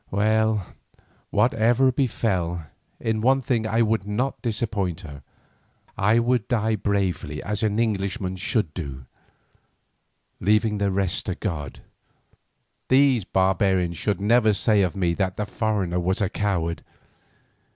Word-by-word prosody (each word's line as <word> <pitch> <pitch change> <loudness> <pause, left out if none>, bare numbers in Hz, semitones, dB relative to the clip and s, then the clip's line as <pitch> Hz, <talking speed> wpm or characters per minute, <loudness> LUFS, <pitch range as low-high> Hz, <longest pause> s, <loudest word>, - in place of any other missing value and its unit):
Well, 110 0 +1 0.6
whatever 120 +4 +3
befell, 95 - -1 0.3
in 110 -1 -1
one 135 +3 +4
thing 120 -4 -1
I 110 +2 +2
would 110 -2 0
not 125 +6 -2
disappoint 105 -6 -2
her, 70 -6 -10 0.7
I 105 +4 +3
would 120 -2 +1
die 110 -2 +1
bravely 95 -7 -1
as 105 0 -3
an 105 -1 0
Englishman 100 -3 -1
should 95 -3 -1
do, 70 -7 -6 1.3
leaving 105 +1 +2
the 100 0 +1
rest 95 0 -1
to 95 - -1
God. 75 -9 -5 1.1
These 130 -5 +4
barbarians 95 -2 +1
should 100 -4 -1
never 110 +1 +4
say 105 +1 +3
of 90 -3 0
me 90 -3 +1
that 95 +1 -2
the 105 - -1
foreigner 100 -5 -1
was 95 +2 0
a 100 -2 +1
coward. 90 -6 -2
105 Hz, 130 wpm, -24 LUFS, 95-110 Hz, 1.3 s, one